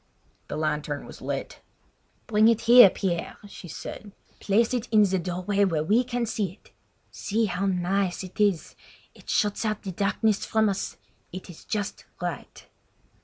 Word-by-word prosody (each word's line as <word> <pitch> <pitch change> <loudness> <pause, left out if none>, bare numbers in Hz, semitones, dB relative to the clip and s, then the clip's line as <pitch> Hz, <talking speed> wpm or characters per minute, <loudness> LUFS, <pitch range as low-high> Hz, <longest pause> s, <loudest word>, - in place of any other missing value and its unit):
The - - -5
lantern 150 -2 -2
was - - -12
lit. - - -5 0.6
"Bring 215 -1 +4
it 230 -1 +3
here, 240 -2 +9
Pierre," 175 -3 -3
she 200 - -11
said. 200 +5 -8 0.3
"Place 225 +5 +2
it 245 -1 -2
in 215 -2 +5
the 190 -2 +1
doorway 185 +3 -1
where 165 -6 +1
we 215 +9 +3
can 245 -1 -2
see 210 -5 -2
it. - - -24 0.4
See 220 +2 -1
how 195 0 -1
nice 185 0 0
it 185 +4 -11
is! 200 -6 +1 0.4
It - - -16
shuts 210 +1 +1
out 215 -1 -2
the 195 - -4
darkness 200 +3 0
from 220 -1 +2
us; 195 0 -3 0.3
it 185 0 -8
is 165 - -15
just 205 -2 -4
right!" - - -6
200 Hz, 165 wpm, -26 LUFS, 180-215 Hz, 0.6 s, here